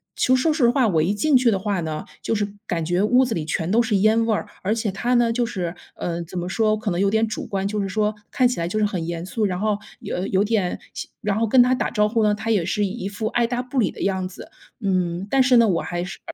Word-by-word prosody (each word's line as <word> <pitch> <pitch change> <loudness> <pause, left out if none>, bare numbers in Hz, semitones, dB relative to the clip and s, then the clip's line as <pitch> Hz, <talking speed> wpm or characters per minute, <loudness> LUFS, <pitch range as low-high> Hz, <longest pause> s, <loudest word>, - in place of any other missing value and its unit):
其 - - 0
实 255 - +5
说 315 +3 +2
实 265 -6 +3
话， 245 -1 +3
我 165 -6 +2
一 175 +6 +1
进 275 +8 +2
去 245 -2 +3
的 200 - +1
话 200 -1 -1
呢， 155 -1 -4 0.2
就 - - -1
是 205 -1 0 0.2
感 170 -3 -1
觉 175 +3 0
屋 250 +5 +4
子 240 - -2
里 165 -5 -3
全 160 +1 -2
都 235 +3 +4
是 225 -2 0
烟 220 +3 +3
味 225 - +1
儿， 210 - -2
而 200 +3 0
且 220 -2 -1
他 240 +6 -1
呢， 235 -1 +3
就 240 +1 +1
是， 180 -7 -4 0.2
呃， 170 -1 -3
怎 175 +2 -9
么 175 - -4
说 215 +3 +1
可 215 -1 -3
能 175 - -1
有 200 +1 +3
点 220 +2 +2
主 215 - -5
观， 195 -1 -2
就 210 0 -2
是 195 - -2
说 210 +2 0 0.2
看 255 - +3
起 245 - -3
来 170 - -1
就 185 - -3
是 215 - +3
很 185 -5 -2
严 170 0 -4
肃。 215 +3 -1
然 185 -2 -1
后 210 0 +1 0.2
有 180 - -4
有 190 +1 +2
点 205 -4 0 0.4
然 210 -2 -1
后 225 - +1
跟 250 +4 +6
他 250 +1 +2
打 - - -1
招 210 -1 +2
呼 225 +1 +1
呢， 210 -1 +3
他 220 +2 -5
也 210 -6 +2
是 205 +3 0
一 195 0 -4
副 205 +2 -3
爱 240 +1 +1
搭 245 +1 -2
不 255 +1 -3
理 210 - +2
的 - - -10
样 190 -1 0
子。 185 - -11 0.3
嗯， 185 -1 -1
但 270 +3 +3
是 250 -1 +5
呢， 230 -1 +6
我 175 -5 +1
还 175 0 -3
是 180 - -7
210 Hz, 310 characters per minute, -22 LUFS, 185-230 Hz, 0.4 s, 跟